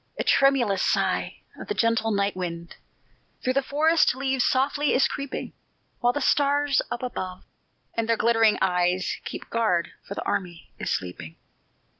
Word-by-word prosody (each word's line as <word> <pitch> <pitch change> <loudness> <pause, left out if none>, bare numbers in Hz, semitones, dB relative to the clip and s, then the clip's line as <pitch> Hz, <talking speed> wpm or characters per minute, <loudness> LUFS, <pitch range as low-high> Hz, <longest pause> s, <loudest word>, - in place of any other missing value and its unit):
A - - -1
tremulous 245 -8 +3
sigh - - 0 0.2
of - - -8
the 420 - -2
gentle 230 -1 +1
night 200 -2 0
wind 170 -2 -5 0.7
Through 255 - +1
the 275 - +2
forest 305 +1 +2
leaves 265 -1 0
softly 285 +3 +1
is 255 - +4
creeping, 280 -2 -5 0.5
While 245 0 +2
the 290 - -2
stars 285 -1 +2
up 240 - -4
above, 185 -7 -5 0.5
with 230 -1 -1
their 230 -1 +2
glittering 225 -1 +3
eyes, 180 0 +1
Keep - - -7
guard, 215 -7 +1
for 200 - -8
the - - -4
army 175 -3 -4
is - - -3
sleeping. 90 -3 -4
230 Hz, 155 wpm, -25 LUFS, 185-275 Hz, 0.7 s, is